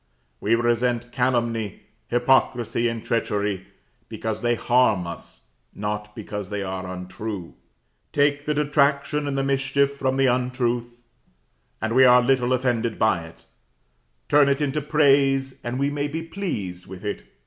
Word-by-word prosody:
We 110 +3 +2
resent 120 +1 0
calumny, 120 -4 -1 0.3
hypocrisy 120 -1 +2
and 115 -1 -4
treachery, 100 -4 -1 0.4
because 110 -1 -4
they 120 0 +2
harm 120 -6 +2
us, 85 -1 -9 0.3
not 105 0 -4
because 105 -3 -6
they 105 -1 -3
are 95 -1 -4
untrue. 95 +1 -6 0.6
Take 145 0 +2
the 150 - 0
detraction 145 0 +1
and 140 -1 -2
the 135 - +1
mischief 140 +1 +1
from 135 -1 -1
the 135 - +3
untruth, 120 -1 -1 0.8
and 110 +1 -2
we 130 +2 +6
are 125 -1 +8
little 125 -1 +2
offended 120 -3 0
by 100 -7 +2
it; 80 - -18 0.8
turn 145 -1 +5
it 140 0 +1
into 150 0 -1
praise, 135 -3 +2
and 120 +1 -3
we 140 +1 0
may 145 0 -1
be 160 +3 -4
pleased 105 - -5
with 95 +2 -10
it. 105 - -3
120 Hz, 145 wpm, -24 LUFS, 110-140 Hz, 0.8 s, are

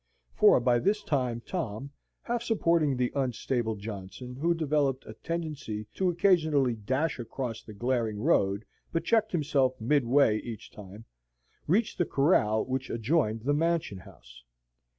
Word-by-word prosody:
For - - +6
by 120 -1 +2
this 205 - 0
time 125 -7 -1
Tom, 135 - -4 0.3
half 240 -1 -2
supporting 170 - +1
the 125 -1 0
unstable 125 -3 -1
Johnson, 105 +4 -8
who 170 +6 +1
developed 145 -4 0
a - - -9
tendency 150 -10 -5
to 190 -1 +1
occasionally 160 -8 +3
dash 130 +8 -1
across 120 -1 -5
the 110 - -12
glaring 115 -2 -1
road, 100 -1 +1 0.3
but 165 - -1
checked 220 -2 +2
himself 140 -6 +1
mid 140 +5 +2
way 120 -3 +4
each 115 -1 -8
time, 105 +2 -12 0.6
reached 210 +7 +1
the 175 - +3
corral 125 -9 +2
which 130 0 -3
adjoined 115 -2 0
the 140 +5 0
Mansion 160 - 0
House. - - -16
130 Hz, 145 wpm, -28 LUFS, 110-160 Hz, 0.6 s, For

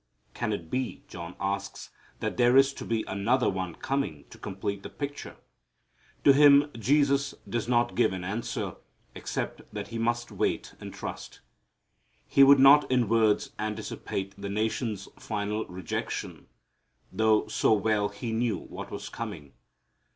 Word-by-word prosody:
Can 110 - -2
it 85 -6 -5
be, 130 -1 -2
John 85 +1 -8
asks, 100 0 -4 0.3
that - - -2
there 120 +1 +5
is 135 0 +5
to - - -8
be 115 -1 0
another 120 +6 +1
one 95 -3 -4
coming 135 - -2
to - - -13
complete 100 +1 -4
the - - -8
picture? 145 0 -6 0.9
To 140 - +8
him 145 +1 +6
Jesus 140 +3 +2
does 120 -1 -2
not 120 -1 +2
give 120 - +3
an 95 -1 -5
answer, 105 +6 -3 0.4
except - - -4
that - - -6
he 115 - -4
must 120 +1 -1
wait - - -1
and - - -8
trust. - - -8 0.9
He 140 - +6
would 140 +1 +8
not 140 +2 +7
in 125 -4 +2
words 110 -2 +3
anticipate 105 -2 -4
the 100 0 -6
nation's 110 -1 -2
final 105 0 -3
rejection, 90 -2 -5 0.6
though 110 -1 +3
so - - +1
well 105 0 +1
He 110 +3 -5
knew 115 0 0
what - - -8
was - - -6
coming. 70 -3 -7
110 Hz, 150 wpm, -28 LUFS, 100-130 Hz, 0.9 s, To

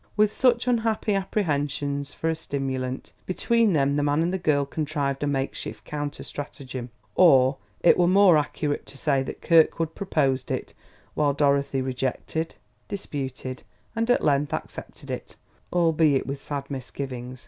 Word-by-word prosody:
With 210 0 +4
such 245 -1 +3
unhappy 225 -3 +1
apprehensions 145 -8 -1
for 165 - -4
a 165 - +1
stimulant, 135 -4 -4
between 225 +2 +2
them 140 -1 +2
the - - +2
man 145 +2 +2
and 175 +2 0
the 190 - -1
girl 145 -4 +2
contrived 140 -2 -2
a 145 - 0
make 135 -1 -1
shift - - -7
counter 145 -1 -4
stratagem; 130 -3 -7 0.2
or 135 - +6 0.2
it 175 - +5
were 175 - +5
more 190 -1 +6
accurate 150 -1 -1
to 135 0 -13
say 135 -2 +1
that 135 - -6
Kirkwood 165 -1 +4
proposed 135 -9 0
it, - - -3 0.4
while 145 -2 +2
Dorothy 140 -2 +2
rejected, 130 +5 -3 0.3
disputed, 135 -9 -5 0.3
and 230 +1 0
at 245 - +3
length 145 -1 +2
accepted - - -8
it, - - -6 0.4
albeit 160 -5 +3
with 140 0 -5
sad 140 -1 -5
misgivings. 130 -1 -6
145 Hz, 150 wpm, -25 LUFS, 135-170 Hz, 0.4 s, or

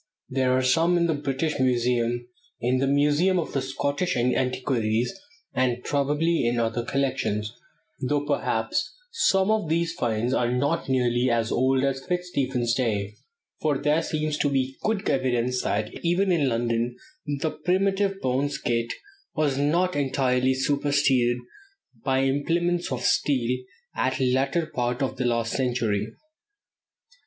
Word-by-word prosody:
There 130 -1 +1
are 130 - +1
some 165 +7 +3
in 170 - +2
the 165 - +1
British 145 +1 -2
Museum, 120 -1 +1 0.3
in 125 +2 +1
the 135 - +1
Museum 150 +7 +3
of 170 - -2
the 135 - 0
Scottish 140 +5 -1
Antiquaries, 125 -2 0 0.4
and 125 -1 0
probably 150 +4 +1
in 120 0 +1
other 115 +1 0
collections; 120 -5 -1 0.5
though 145 +2 0
perhaps 135 - -1 0.2
some 195 - +2
of 215 -7 0
the 170 +1 +2
"finds" 120 -7 -1
are 120 -2 +1
not 140 +5 0
nearly 125 -1 +2
as 115 -1 +1
old 130 +1 +2
as 135 -1 0
Fitzstephen's 135 -10 -1
day, 105 -5 -1 0.5
for 150 -3 +1
there 150 +3 +2
seems 155 -2 -2
to 145 - +2
be 135 -1 -1
good 215 -2 -1
evidence 125 -1 +1
that 105 +1 -1
even 180 +3 +2
in 150 -6 +2
London 115 0 -1 0.4
the 155 +2 -1
primitive 195 +1 0
bone 130 +3 0
skate 115 -4 -2 0.4
was 145 -3 +1
not 170 +6 +1
entirely 130 -2 +1
superseded 140 -3 +2 0.7
by 135 -1 +2
implements 170 +6 0
of 125 -1 -2
steel 125 -3 +2 0.4
at 130 0 0
the 130 -1 +1
latter 140 +6 +1
part 125 -2 -2
of 130 -1 -3
last 115 -2 0
century. 120 -5 0
135 Hz, 140 wpm, -25 LUFS, 120-150 Hz, 0.7 s, some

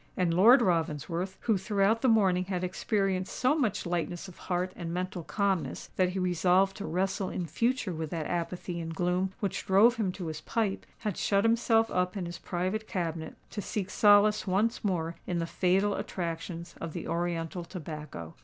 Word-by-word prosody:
And 180 -2 +2
Lord 235 +8 +7
Ravensworth,—who 175 - 0
throughout 205 +3 +2
the 260 - +3
morning 190 -6 +4
had 185 -1 -2
experienced 190 0 -1
so 255 +3 +3
much 255 -10 0
lightness 175 +1 -2
of 185 - -12
heart 180 +1 0
and 170 -1 -5
mental 180 0 -3
calmness 190 -7 -1
that 185 -1 +3
he 185 - -4
resolved 185 +1 +3
to 205 - -5
wrestle 190 +2 -1
in 180 - -3
future 230 - 0
with 160 -1 -4
that 160 -1 -3
apathy 175 +1 -3
and 165 0 -5
gloom 180 +2 0
which 200 -3 -2
drove 220 +5 +5
him 205 -5 0
to 180 - -6
his 155 -1 -5
pipe,—had 210 -1 -3
shut 200 -1 +2
himself 225 0 +3
up 180 +2 0
in 185 - -3
his 170 0 -6
private 185 +5 -2
cabinet, 165 -3 -3 0.2
to 210 - -4
seek 195 -2 -3
solace 210 0 +5
once 215 +6 +1
more 170 -4 -1
in 175 - -1
the 165 - 0
fatal 190 +4 +2
attractions 170 -1 -4
of 165 -2 -5
the - - -5
oriental 170 0 -2
tobacco. 150 - -7
185 Hz, 175 wpm, -29 LUFS, 170-200 Hz, 0.2 s, Lord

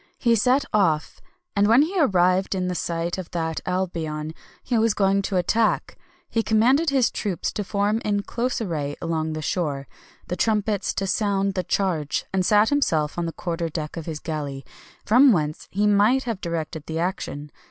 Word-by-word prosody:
He 235 -2 +2
set 255 +5 +3
off, 165 -7 +1 0.3
and 200 0 +3
when 235 +6 +6
he 365 +4 -2
arrived 185 - +2
in 180 -1 -1
sight 170 +1 -2
of 185 - -7
that 160 -2 -3
Albion 160 -4 -2 0.3
he 250 - -1
was 225 -1 +2
going 195 0 +2
to 195 -1 -2
attack, 215 +5 +1 0.3
he 230 - 0
commanded 250 +9 +3
his 265 -3 +2
troops 195 -5 -2
to 210 - -3
form 205 +3 0
in 205 -1 0
close 245 +3 -2
array 150 -9 -3
along 160 -1 -2
the 155 0 -5
shore, 145 -6 -2 0.4
the 180 - -2
trumpets 210 +1 0
to 195 - -1
sound 195 -1 0
the 185 - -1
charge, 165 -6 -1
and 190 -1 +2
sat 210 +3 +4
himself 160 - +1
on 170 - -1
the - - -3
quarter 170 0 -3
deck 155 -1 -5
of 165 -1 -6
his 155 -2 -4
galley, 145 -4 -5 0.4
from 255 +5 +6
whence 155 -6 -1
he 205 +2 0
might 210 +6 +4
have 230 -6 -4
directed 160 -2 -4
the 160 - -3
action. 165 -4 -3
185 Hz, 180 wpm, -24 LUFS, 160-215 Hz, 0.4 s, when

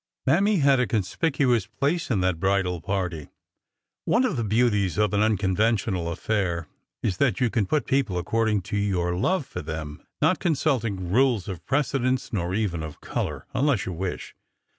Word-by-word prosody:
Mammy 195 +9 +3
had 140 -6 +4
a 125 - +2
conspicuous 120 - +1
place 155 +4 -1
in 105 -7 +1
that 90 -3 0
bridal 95 -2 +1
party. 90 -6 -3 0.8
One 245 +3 +3
of 255 - 0
the 120 - -1
beauties 105 -4 +1
of 105 -1 +2
an 105 - +2
unconventional 100 -3 +1
affair 90 -2 -1 0.4
is 95 -5 0
that 140 -4 +2
you 125 -3 +2
can 110 -6 0
put 150 +4 +1
people 130 -9 0
according 105 +2 0
to - - +2
your 90 -4 0
love 155 - +1
for - - -6
them, 80 -1 -6 0.2
not - - +3
consulting 115 - 0
rules 120 -4 +2
of 90 -4 -6
precedence 130 -3 0
nor 90 -2 -1
even 100 -7 -1
of 80 -1 -7
color, - - -4
unless 140 -6 +1
you 95 - -4
wish. 90 +2 -4
105 Hz, 165 wpm, -25 LUFS, 90-130 Hz, 0.8 s, had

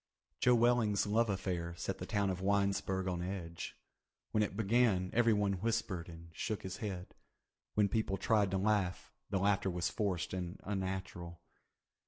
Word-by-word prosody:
Joe 125 -1 +5
Welling's 115 -3 +3
love 110 +2 +2
affair 90 -3 -2
set - - -3
the - - -5
town 100 -3 +1
of 90 0 -4
Winesburg 100 -1 +1
on 90 -2 -1
edge. 90 -2 -5 0.5
When 105 - +2
it 100 -2 -1
began 105 -4 +3
everyone 105 -5 +3
whispered 110 -6 -1
and 85 0 -11
shook 110 +3 -3
his 95 0 -5
head. 95 -4 -5 0.6
When 105 -1 +4
people 100 -1 0
tried 105 -2 +3
to 95 - 0
laugh, 95 -2 0 0.2
the 100 - +1
laughter 100 0 +2
was 90 -1 -1
forced 95 -7 -1
and 90 0 -4
unnatural. 95 -3 -4
95 Hz, 155 wpm, -35 LUFS, 90-105 Hz, 0.6 s, Joe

